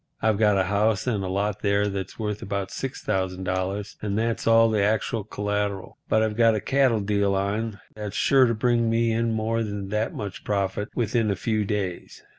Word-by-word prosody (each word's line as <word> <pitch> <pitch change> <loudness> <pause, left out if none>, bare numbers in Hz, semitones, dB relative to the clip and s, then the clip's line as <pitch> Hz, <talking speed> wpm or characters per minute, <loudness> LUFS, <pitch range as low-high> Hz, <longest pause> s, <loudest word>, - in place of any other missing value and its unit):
I've 110 -2 +1
got 105 -2 +4
a 95 - +3
house 105 +2 +1
and 115 -6 0
lot 100 +2 -2
there 100 0 +2
that's 95 -2 -5
worth 105 -2 -3
about 100 -1 -3
$6,000 95 -4 -3
and 100 -1 -2
that's 115 +1 -1
all 115 0 +6
the 105 -2 +2
actual 110 +1 0
collateral. 105 -1 -3
But 110 - +3
I've 110 -1 -1
got 115 -1 +4
a - - 0
cattle 130 0 +2
deal 100 -1 +1
on 100 +2 -2
that's 105 -2 -6
sure 135 -2 +5
to 115 - 0
bring 115 0 +2
me 115 0 +2
in 115 +1 +1
more 110 +1 0
than 100 -3 -4
that 105 +2 -1
much 100 -2 -6
profit 100 +1 -1
within 115 -1 +1
a 100 - +1
few 110 +1 -1
days." 100 -4 -4
105 Hz, 190 wpm, -25 LUFS, 100-115 Hz, -, all